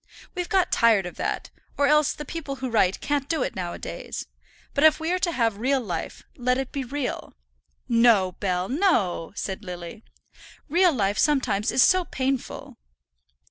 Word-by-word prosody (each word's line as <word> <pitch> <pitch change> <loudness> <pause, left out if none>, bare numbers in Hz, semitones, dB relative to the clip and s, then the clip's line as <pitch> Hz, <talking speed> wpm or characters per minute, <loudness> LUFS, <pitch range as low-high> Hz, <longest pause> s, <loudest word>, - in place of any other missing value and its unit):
We've 360 -2 -4
got 385 -3 +2
tired 220 -5 +4
of 175 - -6
that; - - -3 0.3
or 285 - +3
else 300 0 +4
the 300 - -8
people 290 -3 -5
who 260 -2 -5
write 190 -4 +2
can't 285 -1 -1
do 315 -5 +1
it - - -4
now 175 -2 -4
a - - -7
days. - - -6 0.5
But 285 - +1
if 315 0 +6
we 320 +2 -2
are 365 - +1
to 350 - 0
have 230 -8 0
real 265 +5 +1
life, 210 -8 -5
let 250 0 +1
it 265 -1 -3
be 275 - -3
real." 265 +1 -4 0.5
"No, 230 -6 +4
Bell, 185 -2 -1
no!" 245 - +1
said 195 +1 -4
Lily. 180 +3 -8 0.6
"Real 350 +4 +4
life 205 -7 0
sometimes 255 -8 +2
is 255 - +5
so 370 -1 +4
painful." 265 -4 -4
260 Hz, 180 wpm, -25 LUFS, 205-300 Hz, 0.6 s, if